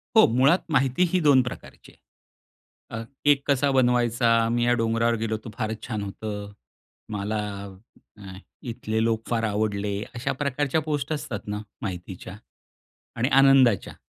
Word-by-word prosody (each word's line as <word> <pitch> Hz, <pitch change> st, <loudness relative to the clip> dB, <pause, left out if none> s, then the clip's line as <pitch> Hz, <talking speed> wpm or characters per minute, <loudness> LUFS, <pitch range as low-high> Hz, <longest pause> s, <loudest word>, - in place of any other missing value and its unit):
हो, 220 Hz, -, +8 dB
मुळात 140 Hz, +8 st, +5 dB
माहिती 135 Hz, +4 st, +2 dB
ही 185 Hz, -, +4 dB
2 145 Hz, -5 st, +5 dB
प्रकारची 125 Hz, -, -9 dB
आहे. -, -, -19 dB
अ, -, -, -5 dB, 0.2 s
केक 145 Hz, -1 st, +5 dB
कसा 140 Hz, 0 st, +3 dB
बनवायचा? 120 Hz, -2 st, +2 dB, 0.2 s
मी 120 Hz, 0 st, +1 dB
या 120 Hz, -, +3 dB
डोंगरावर 115 Hz, +1 st, +1 dB
गेलो 110 Hz, -1 st, -1 dB
होतो. 110 Hz, +1 st, -8 dB
फारच 110 Hz, 0 st, -3 dB
छान 105 Hz, -4 st, -3 dB
होतं. 105 Hz, +1 st, -6 dB, 0.6 s
मला 105 Hz, +2 st, -2 dB, 0.8 s
अ, 95 Hz, -2 st, -10 dB, 0.4 s
इथले 110 Hz, 0 st, -2 dB
लोक 115 Hz, -1 st, -1 dB
फार 115 Hz, -1 st, 0 dB
आवडले. 105 Hz, -1 st, -1 dB, 0.2 s
अशा 130 Hz, +3 st, -2 dB
प्रकारच्या 145 Hz, +2 st, 0 dB
पोस्ट 150 Hz, -1 st, -3 dB
असतात 110 Hz, -10 st, -5 dB
ना, 105 Hz, 0 st, -3 dB, 0.2 s
माहितीच्या 95 Hz, 0 st, -6 dB, 0.8 s
आणि 125 Hz, +4 st, +1 dB
आनंदाच्या. 135 Hz, -6 st, +4 dB
115 Hz, 140 wpm, -25 LUFS, 105-135 Hz, 0.8 s, हो